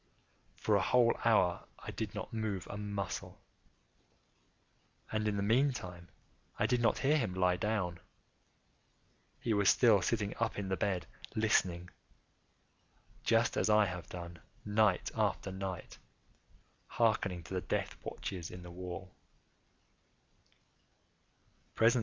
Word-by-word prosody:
For 105 - +1
a 100 - +4
whole 120 +4 +4
hour 95 -6 +3
I - - -7
did 105 -2 -4
not 110 +2 -5
move 110 -5 -2
a - - -5
muscle, 100 -2 -4 1.7
and 110 0 0
in 105 -1 0
the 100 - 0
meantime 105 -7 0 0.5
I - - +2
did 125 +2 +2
not 115 - +3
hear 150 +3 +3
him 105 -8 -2
lie 90 -1 +3
down. 90 -3 -1 1.4
He 115 - +1
was 100 -2 +4
still 110 -6 +5
sitting 105 +1 0
up 115 -1 0
in 100 -2 -3
the 95 - +1
bed 95 -3 -1 0.3
listening;—just 95 -5 +2 1.7
as - - +1
I 105 0 +6
have 90 -2 -5
done, 85 -1 -7 0.3
night 105 -3 +2
after 95 - 0
night, 95 -1 -6 0.9
hearkening 100 -6 +1
to 90 - -9
the 90 - 0
death - - -2
watches 90 -4 -5
in 90 0 -9
the 90 - -9
wall. 90 +1 -7
100 Hz, 125 wpm, -33 LUFS, 90-110 Hz, 1.7 s, I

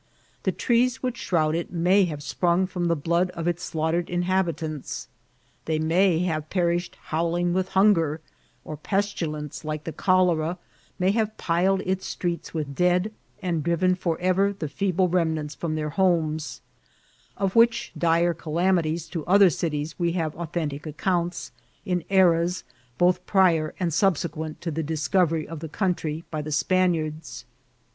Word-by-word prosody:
The - - 0
trees 250 +2 +1
which 250 -2 -2
shroud 155 -6 +1
it 170 +1 -3
may 180 +3 +3
have 150 -4 -5
sprung 175 +4 +1
firom 180 -2 -2
the 170 - +2
blood 170 +4 +1
of 170 0 -3
its 175 0 -1
slaughtered 160 +2 -1
inhabi 180 -1 0
tants; 155 -3 -6 0.6
they 160 -1 0
may 165 +3 +3
have 155 -3 -2
perished 175 -1 0
howling 170 +2 0
with 185 +1 0
hunger; 165 -7 +4 0.5
or 155 - -6
pestilence, 160 -5 -3
like 155 -1 -4
the 165 - -5
cholera, 180 -3 +2 0.4
may 185 0 +2
have 220 0 -1
piled 185 +3 +1
its 190 0 -1
streets 175 -2 -3
with 150 -4 -4
dead, 180 +6 +1 0.3
and 170 -3 0
driven 170 +3 +2
forever 185 +2 +1
the 155 - -3
feeble 185 +4 0
remnants 160 -4 0
from 160 -2 -3
their 150 -1 -2
homes; 160 -4 0 0.8
of 195 -1 -1
which 235 +1 +4
dire 170 +1 +2
calamities 165 0 0
to 165 -3 -4
other 195 0 +6
cities 150 0 -3
we 170 -1 +1
have 160 -4 -2
authentic 155 -3 -4
accounts, 175 +3 -2 0.3
in 180 -4 -1
eras 180 -2 +3 0.3
both 180 0 +3
prior 170 -6 +3
and 175 -3 0
subse 170 0 +2
quent 155 0 -6
to 170 - -3
the 160 +2 -2
discovery 160 +1 0
of 165 0 -7
the 160 0 -7
country 165 -3 -2
by 155 -2 -2
the 155 +1 -6
Span 185 +4 +2
iards. 155 -1 -5
170 Hz, 155 wpm, -25 LUFS, 155-185 Hz, 0.8 s, other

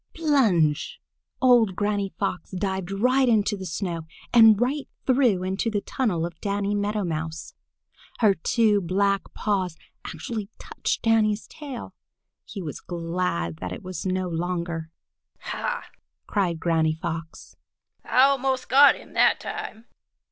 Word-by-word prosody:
Plunge! 265 - +2 0.4
Old 235 -7 +5
Granny 205 -1 -1
Fox 185 -4 -3
dived 190 -1 -3
right 250 +6 +2
into 210 -2 +2
the 190 -2 -6
snow 165 -1 -4 0.3
and 225 -3 +7
right 270 +4 0 0.2
through 245 -8 +3
into 190 +5 -1
the 210 -2 -1
tunnel 195 -12 -1
of 170 -2 -9
Danny 200 0 -1
Meadow 205 +1 -1
Mouse. 160 -1 -4 0.6
Her 215 -4 +4
two 210 +3 +2
black 195 +2 0
paws 190 -5 -1 0.3
actually 205 +5 -5
touched - - -3
Danny's 220 -2 +2
tail. 280 -6 -8 0.5
He 195 - -7
was 150 - -6
glad 165 - -2
then 90 +2 -5
that 90 - -5
it - - -11
was 185 -2 -6
no 185 -1 -1
longer. 170 -1 -3 0.5
"Ha!" 485 0 -3 0.4
cried 180 -5 -1
Granny 160 -2 +1
Fox, 165 -1 -6 0.5
"I 255 - +4
almost 270 -1 +1
got 280 +2 +7
him - - -14
that - - +4
time!" 425 - -7
200 Hz, 135 wpm, -25 LUFS, 170-230 Hz, 0.6 s, and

